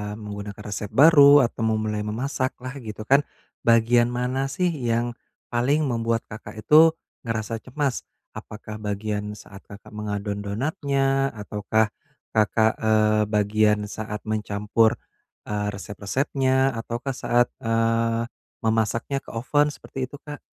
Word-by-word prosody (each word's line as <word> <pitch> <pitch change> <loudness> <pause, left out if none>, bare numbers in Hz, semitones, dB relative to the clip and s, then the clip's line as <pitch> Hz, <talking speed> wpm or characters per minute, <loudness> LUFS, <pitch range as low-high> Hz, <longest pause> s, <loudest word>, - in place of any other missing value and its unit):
menggunakan 105 -1 -7
resep 105 0 -3
baru 145 - +7
atau 115 -1 -1
memulai 110 -1 -2
memasak 130 +5 -2
lah, 130 - -4
gitu 110 -3 -7
kan, 140 +5 +3 0.3
bagian 120 +1 +4
mana 125 +2 -1
sih 175 +6 0
yang 120 -4 -1 0.4
paling 135 +6 +2
membuat 115 -4 0
Kakak 105 - -9
itu 160 +6 +6 0.3
ngerasa 115 0 -2
cemas? 135 +1 -3 0.2
Apakah 105 0 -9
bagian 105 0 -3
saat 100 -1 -12
Kakak 100 0 -13
mengadon 105 -1 -4
donatnya? 135 +5 0
Ataukah 105 +1 0 0.4
Kakak, 110 +1 +2
eee, 110 -1 +3
bagian 105 0 +2
saat 105 0 -6
mencampur, 105 +1 +1 0.5
eee, 105 0 -2
resep-resepnya? 130 +7 0
Ataukah 120 +3 -4
saat, 120 -1 +1
eee, 115 +1 0 0.3
memasaknya 115 +4 0
ke - - -32
oven 145 +5 +2
seperti 130 -1 -6
itu 145 - -11
Kak? 145 -1 -8
115 Hz, 125 wpm, -24 LUFS, 105-130 Hz, 0.5 s, baru